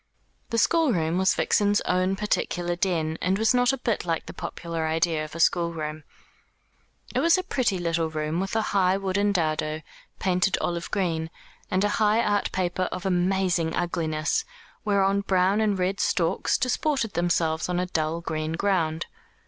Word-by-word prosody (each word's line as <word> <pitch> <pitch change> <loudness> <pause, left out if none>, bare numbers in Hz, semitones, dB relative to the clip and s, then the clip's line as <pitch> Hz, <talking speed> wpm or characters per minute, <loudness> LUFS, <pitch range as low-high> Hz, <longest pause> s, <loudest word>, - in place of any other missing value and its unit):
The 230 - -1
schoolroom 210 - +2
was 190 0 +3
Vixen's 205 0 +2
own 185 +1 +1
particular 175 -3 -1
den, 165 -3 -1
and 185 +2 +1
was 220 +3 +3
not 245 0 +4
a 270 - -2
bit 235 -4 -1
like 165 -2 -2
the - - -8
popular 165 -2 -4
idea 160 0 +1
of 155 +1 -9
a - - -6
schoolroom. 160 -3 0 1.1
It - - +1
was 335 +2 +4
a 370 - -1
pretty 245 - 0
little 165 -2 -1
room, 155 +1 -2
with 195 +3 -3
a 220 - +2
high 190 -1 +3
wooden 200 +1 0
dado, 155 -3 -1 0.3
painted 185 0 +1
olive 170 -1 -2
green, 165 -5 -1 0.4
and 185 +1 +1
a 205 - +2
high 215 +1 +4
art 205 -1 0
paper 185 0 -1
of 185 +1 -5
amazing 180 -2 +1
ugliness, 165 - -1 0.4
whereon 200 -1 +2
brown 190 +1 +2
and 210 -2 +1
red 185 +2 -1
storks 165 -3 +1
disported 255 -3 0
themselves 165 -1 0
on 180 0 0
a 180 - 0
dull 165 -1 -1
green 155 -1 -3
ground. 165 -3 0
180 Hz, 165 wpm, -25 LUFS, 165-200 Hz, 1.1 s, not